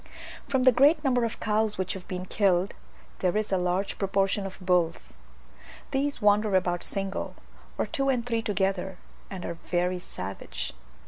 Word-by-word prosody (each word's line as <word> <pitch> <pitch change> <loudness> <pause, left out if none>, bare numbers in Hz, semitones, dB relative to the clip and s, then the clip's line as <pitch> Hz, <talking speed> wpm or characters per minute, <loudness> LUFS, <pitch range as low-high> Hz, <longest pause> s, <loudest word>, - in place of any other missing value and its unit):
From 265 -2 +1
the 255 - +8
great 290 +5 +5
number 250 -4 +3
of 230 - -4
cows 215 0 +1
which 185 +1 -1
have 190 -2 -9
been 185 -1 -4
killed, 185 -1 +2 0.5
there 185 +2 +1
is 215 -1 -1
a 190 - +3
large 180 +2 -1
proportion 195 0 +1
of 190 - -10
bulls. 180 -3 0 0.7
These 280 +1 0
wander 205 0 +4
about 175 -1 +1
single, 195 -1 -2 0.4
or - - +1
two 275 0 0
and 245 -3 +1
three 230 -2 0
together, 190 -3 -1 0.3
and 190 -3 -6
are 170 -1 -5
very 180 +1 +1
savage. 95 - -6
195 Hz, 160 wpm, -28 LUFS, 180-225 Hz, 0.7 s, the